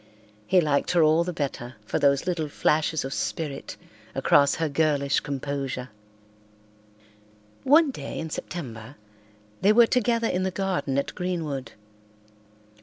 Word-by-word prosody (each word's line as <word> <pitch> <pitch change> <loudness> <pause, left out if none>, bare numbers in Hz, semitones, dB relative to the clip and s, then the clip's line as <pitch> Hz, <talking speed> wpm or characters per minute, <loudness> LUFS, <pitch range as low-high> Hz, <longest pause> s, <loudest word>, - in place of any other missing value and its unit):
He 185 - +4
liked 145 -3 +1
her 170 -2 +5
all 155 +2 +4
the 180 - -3
better 135 -6 -4
for - - -1
those 140 -1 +3
little 165 -4 -2
flashes 155 +1 +1
of 135 - -4
spirit 145 -4 -4 0.4
across 140 0 +4
her 160 - -1
girlish 145 -2 +1
composure. 135 -2 -4 1.7
One 295 +2 +5
day - - -7
in 160 -1 -5
September 125 -8 -7 0.7
they 200 - +5
were 235 +1 +7
together 230 -1 +1
in 180 - -1
the 190 - 0
garden 185 -8 -2
at 140 - -1
Greenwood. 160 -9 -4
155 Hz, 130 wpm, -25 LUFS, 140-180 Hz, 1.7 s, were